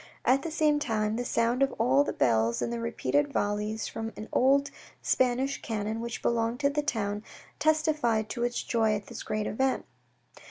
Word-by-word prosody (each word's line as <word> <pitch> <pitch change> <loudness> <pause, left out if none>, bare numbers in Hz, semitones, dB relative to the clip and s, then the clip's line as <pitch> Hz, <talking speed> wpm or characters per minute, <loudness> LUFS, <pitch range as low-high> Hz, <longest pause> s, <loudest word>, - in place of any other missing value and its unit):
At 265 +2 +4
the 330 - -4
same 305 -2 +2
time, 215 -5 0
the 245 - -2
sound 235 +1 +1
of 275 -1 +3
all 135 +3 +3
the - - -2
bells 115 -1 +2
and 235 - -2
the 235 - -3
repeated 285 +5 0
volleys 210 0 -1
from 225 0 -5
an 215 - -7
old 280 +2 +3 0.3
Spanish 260 +2 +1
cannon 220 0 -3
which 235 0 -5
belonged 230 +1 0
to 280 0 +3
the 295 +1 0
town, 210 -7 -2 0.4
testified 305 -8 +2
to 240 - -3
its 240 0 -1
joy 220 -2 +1
at 205 -1 -5
this 235 +3 -8
great 215 0 -2
event. 265 +4 0
235 Hz, 185 wpm, -28 LUFS, 215-275 Hz, 0.4 s, At